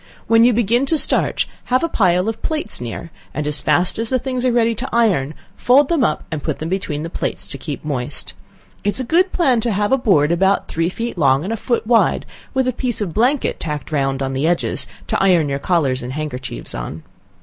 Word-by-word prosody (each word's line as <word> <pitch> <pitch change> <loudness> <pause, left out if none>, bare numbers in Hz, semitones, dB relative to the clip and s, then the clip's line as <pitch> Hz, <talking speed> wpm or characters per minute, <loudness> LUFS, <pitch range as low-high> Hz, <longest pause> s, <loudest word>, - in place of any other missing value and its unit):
When 225 0 +5
you 245 - +6
begin 240 +3 +1
to 320 - +2
starch, - - +2 0.2
have 255 +3 +1
a - - +2
pile 185 - +2
of 225 0 -3
plates 305 - -2
near, 120 +7 -6 0.2
and 150 - -2
as 150 0 +1
fast 175 +7 +2
as 225 0 -2
the 260 - +2
things 255 0 -3
are 255 - +3
ready 230 -1 +2
to 250 +5 -5
iron, 185 - +1 0.2
fold 265 +5 +4
them 330 -6 +2
up, 150 - 0
and 155 -2 -3
put 155 -1 -2
them 160 - -5
between 160 -5 -2
the 165 - -4
plates - - -3
to 140 - -6
keep 150 +1 -6
moist. 130 -5 -3 0.5
It 205 - +1
is - - 0
a - - -1
good 350 +9 +2
plan 260 -9 +2
to 235 - 0
have 205 +1 0
a 265 - +4
board 165 - +3
about 190 +3 +2
three 165 +1 -1
feet 230 0 -5
long 135 -1 +3
and 205 +5 -2
a - - 0
foot 235 +1 -1
wide, 230 0 +3 0.3
with 265 -1 0
a 255 - +1
piece 245 -1 -2
of 195 -6 -3
blanket 250 +6 +1
tacked 150 -2 -5
on 135 -2 0
round 135 0 -3
the 140 +4 +1
edges, 175 0 0 0.2
to - - -1
iron 180 -6 +4
your 140 0 -2
collars 140 -7 +1
and 125 +2 -6
handkerchiefs 130 - -5
on. 65 +6 -6
190 Hz, 230 wpm, -19 LUFS, 150-240 Hz, 0.5 s, you